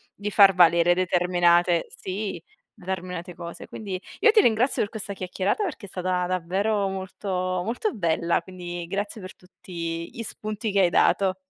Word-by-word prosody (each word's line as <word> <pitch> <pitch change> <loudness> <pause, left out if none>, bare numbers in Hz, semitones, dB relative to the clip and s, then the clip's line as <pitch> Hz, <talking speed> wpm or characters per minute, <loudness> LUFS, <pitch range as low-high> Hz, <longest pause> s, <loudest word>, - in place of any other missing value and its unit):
di 205 +1 -4
far 195 -2 +7
valere 170 0 +5
determinate 175 -1 +3
sì, 190 -3 -5 0.3
determinate 180 -2 -6
cose. 170 0 -8
Quindi, 195 -4 -6 0.2
io 450 - +6
ti 435 - +6
ringrazio 235 - +2
per 205 - -1
questa 210 -2 -5
chiacchierata 190 - -2
perché 320 - -5
è - - -9
stata 180 0 -1
davvero 195 +4 0
molto 190 +1 -6 0.3
molto 245 - -2
bella, 170 -2 0
quindi 175 -1 -7
grazie 205 +3 -4
per 185 - -9
tutti 170 -2 -6
gli 230 - -6
spunti 215 0 -4
che 200 0 +3
hai 180 - +4
dato. 190 +2 +3
185 Hz, 155 wpm, -25 LUFS, 175-205 Hz, 0.3 s, far